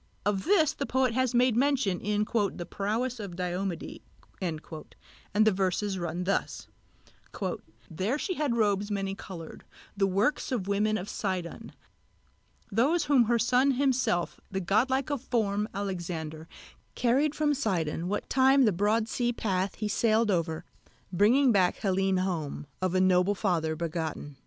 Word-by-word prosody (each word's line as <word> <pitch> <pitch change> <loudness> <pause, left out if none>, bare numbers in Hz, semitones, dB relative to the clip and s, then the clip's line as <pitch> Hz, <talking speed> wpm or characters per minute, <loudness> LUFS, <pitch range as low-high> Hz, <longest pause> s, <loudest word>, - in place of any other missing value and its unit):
Of 200 -2 0
this 320 -6 +4
the 280 - -4
poet 260 -2 +1
has 255 0 0
made 245 -1 +4
mention 250 -8 +1
in 210 0 0
the 200 -6 -1
"prowess 225 +6 -2
of 200 -5 -6
Diomede," 180 0 -4 0.4
and 165 -4 -2 0.8
the 215 +1 +5
verses 190 +1 -1
run 170 +1 -3
thus: 195 +2 -2 1.2
"There 190 - -1
she 370 - -2
had 295 -7 -1
robes 205 -2 +1
many 195 -1 -2
coloured, 175 -4 -9 0.3
the 195 -1 +2
works 205 +11 0
of 215 -7 -2
women 210 +2 +1
of 190 0 -5
Sidon, 185 -5 -4 1.0
Those 280 - +2
whom 275 -5 +4
her 235 +1 +2
son 250 +4 +3
himself 255 -9 0
the 190 - -2
god 205 +8 +2
like 265 +2 0
of 285 -4 -2
form 215 -4 0
Alexander 170 -5 -4 0.5
Carried 275 +5 +2
from 300 -1 +2
Sidon, 175 - -1
what 205 +2 -2
time 265 +1 +4
the 215 - +4
broad 210 +4 +1
sea 240 +1 0
path 195 -4 -1
he 210 - -3
sailed 220 +1 +2
over 165 -3 -1 0.5
Bringing 240 +8 +4
back 185 -4 +3
Helene 195 -1 +1
home, 170 -7 -2 0.2
of 185 0 0
a - - +4
noble 185 +2 +3
father 165 -6 0
begotten." 160 -3 -4
205 Hz, 150 wpm, -28 LUFS, 185-245 Hz, 1.2 s, the